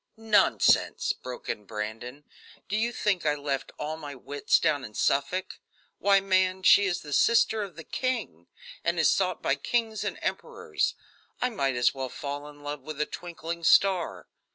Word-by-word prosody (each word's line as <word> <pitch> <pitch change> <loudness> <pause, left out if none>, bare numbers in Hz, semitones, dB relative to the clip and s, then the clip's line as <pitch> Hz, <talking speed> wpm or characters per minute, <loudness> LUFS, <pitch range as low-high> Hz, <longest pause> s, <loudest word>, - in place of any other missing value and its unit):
"Nonsense!" 220 -1 +3
broke 125 -1 -9
in 105 - -4
Brandon. 115 +6 -6 0.4
"Do 205 - -2
you 230 +2 +1
think 205 -6 0
I 150 -1 +2
left 140 -2 -3
all 155 +1 -4
my 145 -3 -8
wits 140 +2 +1
down 145 -3 +1
in 105 - -9
Suffolk? 180 +7 0 0.4
Why, 200 0 +5
man, 185 -1 +1
she 200 +2 +7
is 180 -2 -1
the 145 -1 -7
sister 225 +1 +4
of 195 -5 -6
the 165 - -9
king, 225 - -3 0.4
and 170 0 0
is 160 - +5
sought 185 -3 0
by - - +2
kings 220 +9 -1
and - - -3
emperors. - - -2 0.4
I 250 - 0
might 135 - 0
as 120 0 +3
well 135 -1 -4
fall 145 +3 -6
in 145 0 -15
love 145 -1 -5
with 150 +1 -8
a 150 - +2
twinkling 170 0 -6
star. 170 - +3
155 Hz, 175 wpm, -27 LUFS, 140-195 Hz, 0.4 s, she